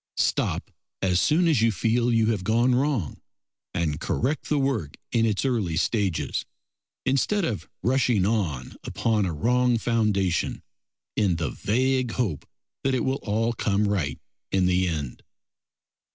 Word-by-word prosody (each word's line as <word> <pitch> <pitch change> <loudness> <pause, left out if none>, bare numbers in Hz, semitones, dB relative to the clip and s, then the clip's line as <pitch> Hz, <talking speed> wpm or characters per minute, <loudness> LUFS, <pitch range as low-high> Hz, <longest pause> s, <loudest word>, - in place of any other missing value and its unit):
Stop - - 0 0.3
as 90 -1 +3
soon 170 +3 +3
as 150 -9 +3
you 115 0 +4
feel 115 +4 +1
you 115 -1 +3
have 100 -5 -2
gone 120 +5 +3
wrong 130 - 0 0.5
and 75 -2 -1
correct 135 - -1
the 150 - +2
work 130 - -1
in 115 -1 +3
its 105 +3 0
early 105 -11 0
stages, 100 -2 0 0.6
instead 165 +9 +1
of 100 - -4
rushing 120 -4 +2
on 90 - -1
upon 105 +1 0
a - - -1
wrong 125 +8 +2
foundation 105 -7 0 0.5
in 100 -5 +2
the 80 -6 -2
vague 130 +2 0
hope 100 - -2 0.4
that 135 -1 +2
it 125 - 0
will 135 +1 0
all 115 +2 0
come 105 -2 +1
right 80 -10 -1 0.3
in 95 -1 +2
the 90 0 +2
end. 75 -7 -4
110 Hz, 145 wpm, -25 LUFS, 90-125 Hz, 0.6 s, you